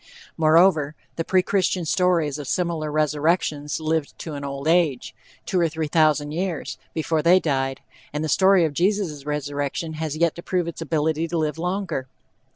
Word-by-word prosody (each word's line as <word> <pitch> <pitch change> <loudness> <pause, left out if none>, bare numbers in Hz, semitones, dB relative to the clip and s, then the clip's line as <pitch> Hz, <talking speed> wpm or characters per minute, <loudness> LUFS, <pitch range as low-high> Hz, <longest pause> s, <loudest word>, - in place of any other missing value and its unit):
Moreover, 160 -2 +4 0.2
the 165 - -1
pre 185 +2 +2
Christian 185 -2 0
stories 165 -4 +1
of 145 - -6
similar 165 -3 -1
resurrections 150 0 0
lived 160 -1 -2
to 160 - -7
an 140 -1 -6
old 140 +1 -5
age, 160 -6 +2 0.3
two 185 - 0
or 170 -1 +2
three 160 0 -3
thousand 150 -1 +2
years 170 -1 -3 0.2
before 160 0 0
they 175 +4 +5
died, 135 -5 -1 0.3
and 150 +1 -3
the - - -1
story 190 +1 +4
of 155 - -2
Jesus' 175 -5 -1
resurrection 145 +2 -3
has 155 -1 -4
yet 170 0 +2
to - - -6
prove 180 -1 -1
its 170 - -6
ability 160 +1 0
to 170 +1 -2
live 155 0 -1
longer. 180 -6 -2
160 Hz, 170 wpm, -23 LUFS, 150-170 Hz, 0.3 s, they